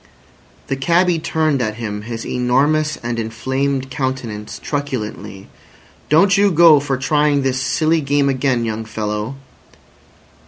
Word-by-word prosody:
The 135 Hz, -, -2 dB
cabby 170 Hz, +5 st, +2 dB
turned 155 Hz, -3 st, 0 dB
at 110 Hz, -3 st, -2 dB
him 105 Hz, -3 st, -5 dB
his 115 Hz, +1 st, -6 dB
enormous 145 Hz, +5 st, +1 dB
and 120 Hz, -1 st, -2 dB
inflamed 130 Hz, +4 st, -2 dB
countenance 130 Hz, -6 st, -4 dB
truculently. 105 Hz, -, -5 dB, 0.6 s
"Don't 190 Hz, +6 st, +5 dB
you 205 Hz, 0 st, +5 dB
go 165 Hz, -3 st, +6 dB
for 140 Hz, -2 st, -2 dB
trying 145 Hz, +1 st, +1 dB
this 130 Hz, -1 st, 0 dB
silly 155 Hz, +5 st, +1 dB
game 140 Hz, 0 st, +1 dB
again, 130 Hz, -3 st, 0 dB
young 110 Hz, 0 st, -3 dB
fellow." 110 Hz, +2 st, -4 dB
135 Hz, 125 wpm, -18 LUFS, 115-150 Hz, 0.6 s, go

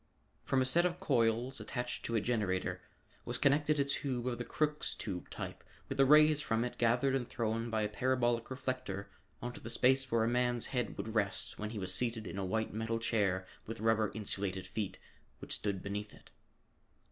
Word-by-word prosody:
From 130 Hz, -1 st, +2 dB
a -, -, -1 dB
set 165 Hz, +7 st, +4 dB
of 180 Hz, 0 st, 0 dB
coils 125 Hz, -5 st, +1 dB
attached 125 Hz, -1 st, -4 dB
to 115 Hz, -, -1 dB
a 110 Hz, -, +3 dB
generator 100 Hz, -6 st, 0 dB, 0.4 s
was 120 Hz, +1 st, -2 dB
connected 145 Hz, +2 st, +3 dB
a 140 Hz, -, +3 dB
tube 130 Hz, -3 st, -2 dB
of 120 Hz, -2 st, -1 dB
the -, -, -1 dB
Crookes 150 Hz, +3 st, 0 dB
tube 90 Hz, -4 st, -5 dB
type -, -, -6 dB, 0.2 s
with 135 Hz, -, -5 dB
the 135 Hz, -, +6 dB
rays 150 Hz, +1 st, +7 dB
from 115 Hz, -3 st, +1 dB
it 125 Hz, -, -6 dB
gathered 120 Hz, +3 st, +3 dB
and 130 Hz, -3 st, -1 dB
thrown 115 Hz, 0 st, -1 dB
by 110 Hz, -1 st, +1 dB
a -, -, +2 dB
parabolic 120 Hz, 0 st, +1 dB
reflector 130 Hz, -6 st, -4 dB, 0.3 s
onto 120 Hz, 0 st, -5 dB
the 115 Hz, -, -6 dB
space 130 Hz, +2 st, +3 dB
where 115 Hz, -1 st, +3 dB
a -, -, +2 dB
man's 120 Hz, 0 st, +2 dB
head 125 Hz, -2 st, -1 dB
would 110 Hz, -, -4 dB
rest 100 Hz, -2 st, -1 dB
when 105 Hz, 0 st, -3 dB
he 110 Hz, -, -6 dB
was 95 Hz, -2 st, -2 dB
seated 115 Hz, +2 st, 0 dB
in 100 Hz, -, -4 dB
a -, -, -1 dB
white 110 Hz, +3 st, -1 dB
metal 110 Hz, +1 st, -1 dB
chair 100 Hz, -5 st, +1 dB, 0.2 s
with 115 Hz, +1 st, -5 dB
rubber 110 Hz, -1 st, +2 dB
insulated 95 Hz, -3 st, -3 dB
feet, 95 Hz, -1 st, -3 dB, 0.4 s
which -, -, -5 dB
stood 100 Hz, -3 st, -1 dB
beneath 105 Hz, +1 st, -4 dB
it. -, -, -18 dB
115 Hz, 195 wpm, -34 LUFS, 105-130 Hz, 0.4 s, rays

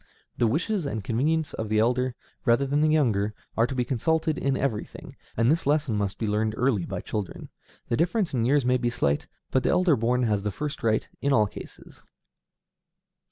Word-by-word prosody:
The 120 Hz, -, +2 dB
wishes 165 Hz, -, 0 dB
and 110 Hz, -6 st, -3 dB
convenience 145 Hz, +8 st, 0 dB
of 110 Hz, -1 st, -4 dB
the 110 Hz, -, +1 dB
elder, 125 Hz, +3 st, +1 dB, 0.3 s
rather 120 Hz, +2 st, +3 dB
than 140 Hz, +2 st, +1 dB
of -, -, +4 dB
the -, -, +2 dB
younger, 110 Hz, -9 st, +1 dB, 0.2 s
are 115 Hz, +1 st, +3 dB
to 130 Hz, -, -5 dB
be 125 Hz, -1 st, 0 dB
consulted 155 Hz, +5 st, 0 dB
in 135 Hz, -1 st, 0 dB
everything, 120 Hz, -6 st, -4 dB, 0.2 s
and 115 Hz, +4 st, +4 dB
this 165 Hz, -2 st, 0 dB
lesson 145 Hz, -6 st, +2 dB
must 100 Hz, -1 st, -2 dB
be 115 Hz, -, -2 dB
learned 110 Hz, +1 st, 0 dB
early 120 Hz, -8 st, +1 dB
by -, -, -4 dB
children. 105 Hz, -4 st, -5 dB, 0.4 s
The 115 Hz, -, 0 dB
difference 180 Hz, +1 st, +1 dB
in 120 Hz, -3 st, +1 dB
years 135 Hz, +2 st, +3 dB
may 125 Hz, 0 st, +3 dB
be 120 Hz, -1 st, 0 dB
slight, 75 Hz, -11 st, 0 dB, 0.2 s
but 130 Hz, -, +2 dB
the -, -, 0 dB
elder 180 Hz, -4 st, +4 dB
born 125 Hz, +2 st, +1 dB
has 105 Hz, -4 st, +1 dB
the 105 Hz, -, -2 dB
first 145 Hz, +7 st, -5 dB
right 110 Hz, -1 st, +1 dB
in 140 Hz, -, +1 dB
all 110 Hz, -5 st, +4 dB
cases. -, -, -11 dB
125 Hz, 205 wpm, -26 LUFS, 110-145 Hz, 0.4 s, of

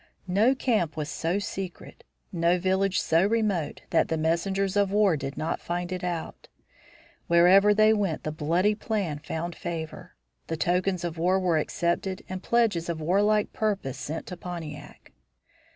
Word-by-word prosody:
No 210 Hz, +8 st, +3 dB
camp 215 Hz, -, 0 dB
was 150 Hz, -1 st, -3 dB
so 165 Hz, +5 st, -1 dB
secret, 195 Hz, -3 st, -6 dB, 0.3 s
no 170 Hz, 0 st, +2 dB
village 190 Hz, +1 st, +1 dB
so 165 Hz, +2 st, +2 dB
remote, 205 Hz, -7 st, 0 dB
that -, -, +3 dB
the 160 Hz, -, -1 dB
messengers 185 Hz, +5 st, 0 dB
of 200 Hz, -1 st, +2 dB
war 205 Hz, -4 st, +4 dB
did 140 Hz, -1 st, -5 dB
not 155 Hz, -, -2 dB
find 175 Hz, +1 st, -3 dB
it 185 Hz, 0 st, -4 dB
out. 175 Hz, -2 st, -4 dB, 0.8 s
Wherever 180 Hz, +4 st, +6 dB
they 215 Hz, +1 st, +5 dB
went 200 Hz, -7 st, -1 dB
the 155 Hz, -, -2 dB
bloody 170 Hz, +7 st, +1 dB
plan 205 Hz, -8 st, -2 dB
found 160 Hz, +2 st, -5 dB
favor; 160 Hz, -2 st, -6 dB, 0.3 s
the 165 Hz, -, -3 dB
tokens 180 Hz, +2 st, 0 dB
of 170 Hz, -1 st, -4 dB
war 185 Hz, +3 st, +2 dB
were 175 Hz, -4 st, +2 dB
accepted 175 Hz, +4 st, -2 dB
and 185 Hz, 0 st, -5 dB
pledges 215 Hz, -9 st, +1 dB
of 165 Hz, -2 st, -2 dB
warlike 205 Hz, +6 st, +2 dB
purpose 200 Hz, -, -2 dB
sent 155 Hz, +3 st, -5 dB
to 180 Hz, -, -7 dB
Pontiac. 155 Hz, -5 st, -8 dB
180 Hz, 155 wpm, -27 LUFS, 165-195 Hz, 0.8 s, Wherever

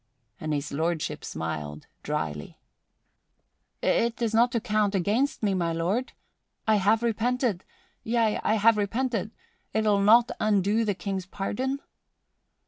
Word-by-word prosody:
And 155 Hz, -, -3 dB
His 145 Hz, -1 st, -2 dB
Lordship 160 Hz, +2 st, -2 dB
smiled 75 Hz, -2 st, -5 dB, 0.2 s
dryly. 75 Hz, -2 st, -4 dB, 1.3 s
"It 235 Hz, +1 st, +1 dB
is 230 Hz, -2 st, 0 dB
not 235 Hz, +2 st, +4 dB
to 235 Hz, -, +2 dB
count 210 Hz, -2 st, 0 dB
against 220 Hz, +9 st, 0 dB
me, 200 Hz, -2 st, +2 dB
my 170 Hz, -3 st, 0 dB
lord? 190 Hz, +10 st, -1 dB, 0.5 s
I 215 Hz, -1 st, +5 dB
have 215 Hz, +4 st, +2 dB
repented 235 Hz, -3 st, 0 dB, 0.4 s
yea, 225 Hz, -2 st, +1 dB
I 215 Hz, -, +2 dB
have 225 Hz, +1 st, +4 dB
repented! 225 Hz, 0 st, -1 dB, 0.5 s
'Twill 210 Hz, -2 st, +3 dB
not 230 Hz, +4 st, +6 dB
undo 210 Hz, +1 st, +2 dB
the 205 Hz, -2 st, 0 dB
King's 190 Hz, 0 st, -4 dB
pardon?" 255 Hz, +9 st, -3 dB
210 Hz, 130 wpm, -27 LUFS, 180-230 Hz, 1.3 s, not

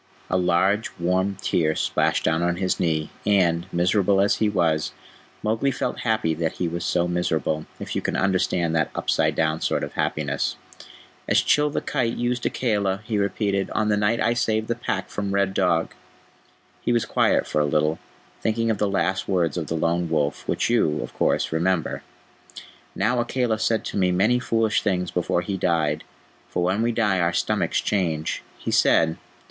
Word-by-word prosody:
A -, -, +2 dB
large, 95 Hz, +4 st, +2 dB
warm 95 Hz, +3 st, 0 dB
tear 80 Hz, -2 st, +1 dB
splashed -, -, +1 dB
down 80 Hz, +1 st, +1 dB
on 85 Hz, 0 st, +1 dB
his 95 Hz, 0 st, -1 dB
knee, 80 Hz, -2 st, 0 dB
and, 90 Hz, -4 st, +2 dB
miserable 95 Hz, +3 st, +2 dB
as 100 Hz, +1 st, +3 dB
he 110 Hz, -, +2 dB
was, 80 Hz, -6 st, 0 dB, 0.5 s
Mowgli 110 Hz, +5 st, +1 dB
felt 135 Hz, -, -3 dB
happy 110 Hz, -8 st, 0 dB
that 80 Hz, 0 st, -2 dB
he 90 Hz, -, -2 dB
was 85 Hz, +1 st, -4 dB
so 90 Hz, -1 st, +1 dB
miserable, 80 Hz, -3 st, -1 dB
if -, -, -5 dB
you -, -, 0 dB
can -, -, -2 dB
understand 90 Hz, -3 st, +1 dB
that 80 Hz, -, +1 dB
upside -, -, +1 dB
down 80 Hz, 0 st, 0 dB
sort -, -, 0 dB
of -, -, -5 dB
happiness. 70 Hz, -2 st, -1 dB, 0.7 s
"As -, -, +4 dB
Chil 150 Hz, 0 st, +3 dB
the -, -, -2 dB
Kite 120 Hz, -5 st, -1 dB
used 120 Hz, 0 st, 0 dB
Akela," 100 Hz, -5 st, 0 dB
he 110 Hz, -2 st, -1 dB
repeated, 100 Hz, -1 st, 0 dB
"on 110 Hz, -1 st, +1 dB
the 105 Hz, -, +3 dB
night 105 Hz, +3 st, +1 dB
I 115 Hz, -, +2 dB
saved 110 Hz, -2 st, 0 dB
the -, -, +2 dB
Pack 110 Hz, -5 st, -3 dB
from 100 Hz, -1 st, -3 dB
Red 100 Hz, -1 st, +1 dB
Dog." 90 Hz, -4 st, +1 dB, 0.9 s
He -, -, 0 dB
was 120 Hz, -2 st, +2 dB
quiet -, -, +2 dB
for 75 Hz, -, 0 dB
a -, -, +2 dB
little, 75 Hz, +2 st, +1 dB, 0.4 s
thinking 115 Hz, +1 st, +1 dB
of 105 Hz, -, -2 dB
the 105 Hz, -, +1 dB
last 95 Hz, -1 st, 0 dB
words 85 Hz, -5 st, +1 dB
of 85 Hz, -3 st, -3 dB
the 80 Hz, -, -2 dB
Lone 85 Hz, +1 st, 0 dB
Wolf, 75 Hz, -2 st, -1 dB
which -, -, 0 dB
you, 115 Hz, -11 st, +2 dB
of -, -, -9 dB
course, -, -, +1 dB
remember. 85 Hz, +1 st, 0 dB, 0.9 s
"Now 115 Hz, +5 st, +1 dB
Akela 120 Hz, -2 st, 0 dB
said 110 Hz, 0 st, 0 dB
to -, -, -4 dB
me 90 Hz, -2 st, +2 dB
many 105 Hz, +7 st, +3 dB
foolish 115 Hz, -3 st, +1 dB
things 90 Hz, -3 st, -1 dB
before 90 Hz, 0 st, 0 dB
he 95 Hz, +2 st, -3 dB
died, 80 Hz, -4 st, 0 dB, 0.5 s
for 90 Hz, -, -1 dB
when 95 Hz, +4 st, +1 dB
we 120 Hz, +1 st, +2 dB
die 105 Hz, -5 st, +1 dB
our 85 Hz, 0 st, +1 dB
stomachs -, -, 0 dB
change. 80 Hz, -6 st, -1 dB, 0.2 s
He -, -, -4 dB
said... 80 Hz, 0 st, +3 dB
95 Hz, 185 wpm, -24 LUFS, 85-110 Hz, 0.9 s, As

